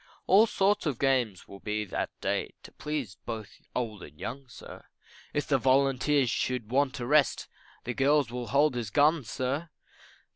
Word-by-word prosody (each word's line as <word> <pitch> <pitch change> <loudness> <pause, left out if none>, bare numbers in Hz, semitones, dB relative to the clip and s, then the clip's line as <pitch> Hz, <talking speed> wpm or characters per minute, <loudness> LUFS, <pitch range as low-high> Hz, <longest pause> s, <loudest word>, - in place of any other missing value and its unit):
All 205 +5 +6
sorts 200 -3 +1
of 140 -5 -1
games 125 -8 0
will 100 - -11
be 105 +1 -2
that 100 - -3
day, - - -2
To - - -12
please 145 -10 -4
both 110 -3 -6
old 110 -5 -3
and 75 -2 -12
young, 135 +2 -6
sir; 120 - -12 0.5
If 145 - -1
the 135 -2 +2
volunteers 135 0 +3
should 125 -3 -2
want 135 0 +1
a 120 - -3
rest, 145 +2 +3 0.4
The 120 - -3
girls 140 -1 +2
will 125 -1 -4
hold 145 +4 +3
his 120 -4 -3
gun, 150 +5 +3
sir. 130 +9 -3
130 Hz, 170 wpm, -29 LUFS, 115-145 Hz, 0.5 s, All